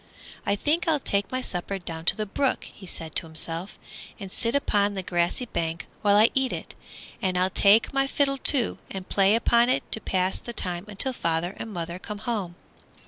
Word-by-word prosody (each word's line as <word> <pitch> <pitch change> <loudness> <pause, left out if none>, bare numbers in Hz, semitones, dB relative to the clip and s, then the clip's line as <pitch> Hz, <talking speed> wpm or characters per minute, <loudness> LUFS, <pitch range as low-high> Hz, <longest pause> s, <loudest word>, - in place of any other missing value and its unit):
"I 200 - +2
think 305 - 0
I'll 310 -3 +3
take 200 -6 0
my 255 0 -1
supper 195 -3 -3
down 165 -3 -7
to - - +5
the 215 - -2
brook," 260 +6 0
he 190 - -12
said 160 -2 -6
to - - 0
himself, 165 +4 -6 0.4
"and 195 -3 -8
sit 230 +6 0
upon 205 -7 +2
the 190 - -3
grassy 175 +8 0
bank 165 -6 -3 0.2
while 205 -2 +4
I 220 +2 +6
eat 265 -1 +1
it. - - -6 0.5
And 185 -2 0
I'll 185 +1 +2
take 210 +7 +4
my 275 0 +2
fiddle, 275 0 +1
too, 260 -3 +5
and 190 -1 -7
play 195 +1 +3
upon 235 +1 +4
it 255 - +1
to 220 - +1
pass 185 0 0
the 235 - -8
time 180 -3 -3
until 210 +6 -2
father 170 -3 -1
and 225 - -6
mother 170 -1 -5
come 210 +2 -6
home." 205 -6 -3
200 Hz, 200 wpm, -26 LUFS, 180-235 Hz, 0.5 s, I